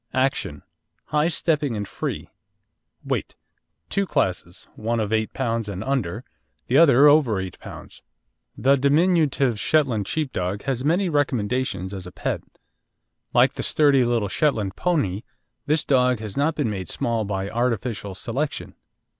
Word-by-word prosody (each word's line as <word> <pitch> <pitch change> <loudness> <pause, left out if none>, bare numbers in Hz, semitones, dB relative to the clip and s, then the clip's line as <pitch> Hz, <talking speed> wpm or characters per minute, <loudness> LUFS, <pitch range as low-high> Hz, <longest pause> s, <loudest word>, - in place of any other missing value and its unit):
ACTION 130 - -1 0.5
High 150 +1 +2
stepping 150 -7 0
and 105 -1 -4
free. - - -5 0.7
WEIGHT - - -2 0.5
Two 200 -1 -1
classes, 95 - -2
one 115 +2 -1
of 110 0 -1
8 110 0 0
lb. 115 -4 -2
and 100 +1 -4
under, 120 -5 -2 0.4
the 125 - -1
other 145 -2 +7
over 145 -9 +4
8 95 -1 -5
lb. - - -11 0.6
The 135 +2 +4
diminutive 140 - +2
Shetland 125 -10 +1
Sheepdog 100 - -2
has 130 -2 -2
many 175 +6 +2
recommendations 125 - -1
as 95 -2 -6
a - - -9
pet. - - -3 0.9
Like - - +4
the - - -5
sturdy 145 -4 +3
little 120 -3 +1
Shetland 105 - 0
pony, 130 - 0 0.5
this 155 +1 +2
dog 125 -2 +3
has 110 -2 -7
not 150 +3 +1
been 135 -8 -1
made 95 -4 -5
small 115 -2 -1
by 100 -1 -3
artificial 115 -4 -2
selection. 135 +9 -3
125 Hz, 140 wpm, -23 LUFS, 105-145 Hz, 0.9 s, other